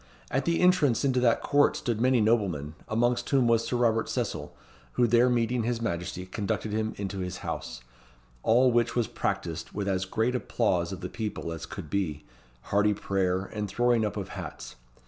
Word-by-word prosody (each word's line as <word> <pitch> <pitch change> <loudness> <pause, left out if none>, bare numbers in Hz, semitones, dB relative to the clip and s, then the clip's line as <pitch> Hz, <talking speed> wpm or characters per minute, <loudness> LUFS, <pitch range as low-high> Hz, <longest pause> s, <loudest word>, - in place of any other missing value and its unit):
At - - 0
the 170 0 +1
entrance 160 -9 +4
into 130 -2 +2
that 120 -2 +2
court 145 0 +3
stood 115 -2 -2
many 130 -1 +4
noblemen, 95 -10 +1
amongst 120 +2 +1
whom 135 -4 +3
was 115 -1 +3
Sir 125 - 0
Robert 115 -2 +2
Cecil, - - -3 0.4
who 120 - +3
there 120 +2 +4
meeting 120 0 +1
his 115 +1 -1
Majesty 90 -4 -3
conducted 100 +2 -3
him 110 0 -1
into 100 -1 -4
his 90 -1 -4
house, - - -5 0.6
all 125 - +4
which 120 0 +1
was 120 -2 +2
practised 85 -4 -3
with 100 -1 -3
as 95 -1 0
great 110 +6 0
applause 100 -8 0
of 95 -1 -6
the 90 - -3
people 105 -6 -4
as 80 -2 -6
could 75 - -8
be, 85 -7 -1 0.4
hearty 105 +5 +2
prayer, 95 -2 0
and 105 -2 -3
throwing 120 +2 +2
up 105 0 -2
of 100 - -4
hats. - - -7
110 Hz, 185 wpm, -28 LUFS, 95-120 Hz, 0.6 s, entrance